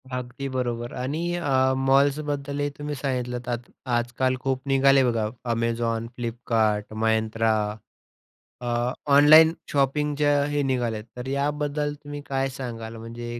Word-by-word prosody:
अगदी 125 +2 -4
बरोबर 120 -2 -3
आणि 145 +6 -2
अ, 130 -5 +2
मॉल्सबद्दलही 140 +1 +1
तुम्ही 145 0 -4
सांगितलंत 125 -3 -3
आत 120 0 -4 0.3
आजकाल 120 +2 0
खूप 130 -1 -1
निघाले 135 0 +5
बघा 115 -2 0 0.3
Amazon, 115 0 -1
Flipkart, 115 -3 0 0.2
Myntra 110 0 +2 1.1
अ, 120 0 0 0.2
ऑनलाईन 155 +3 +8 0.2
शॉपिंगचं 145 +1 +2
हे 145 0 0
निघाल्यात. 115 -4 -1
तर 125 +1 -6
याबद्दल 145 +1 -1
तुम्ही 145 0 -7
काय 135 0 0
सांगाल 115 -4 -6
म्हणजे 120 +1 -7
130 Hz, 115 wpm, -25 LUFS, 120-145 Hz, 1.1 s, ऑनलाईन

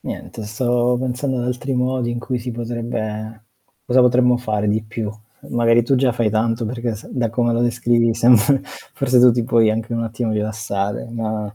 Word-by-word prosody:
niente 110 - -7
stavo 120 +3 0
pensando 130 +1 -2
ad 120 - -2
altri 125 +2 -3
modi 125 -1 0
in 120 - -3
cui 125 +1 -3
si 120 +1 -5
potrebbe 115 -2 -5 0.4
cosa 130 +1 +3
potremmo 125 0 +4
fare 105 -4 -2
di 110 +1 +1
più? 110 -1 -5 0.4
Magari 120 0 +3
tu 135 - +2
già 130 -1 +2
fai 115 -2 0
tanto 115 +2 0
perché 120 0 -3
se 105 - -12
da 120 -3 -1
come 120 +1 +1
lo 115 - 0
descrivi 120 -1 +2
sembr 120 +3 +4 0.3
forse 130 -2 +2
tu 125 0 +8
ti 120 -1 -1
puoi 115 -2 +3
anche 115 +2 -3
un 115 0 -1
attimo 115 0 -3
rilassare, 105 -2 -3
ma 110 -2 -4
120 Hz, 185 wpm, -20 LUFS, 110-125 Hz, 0.4 s, tu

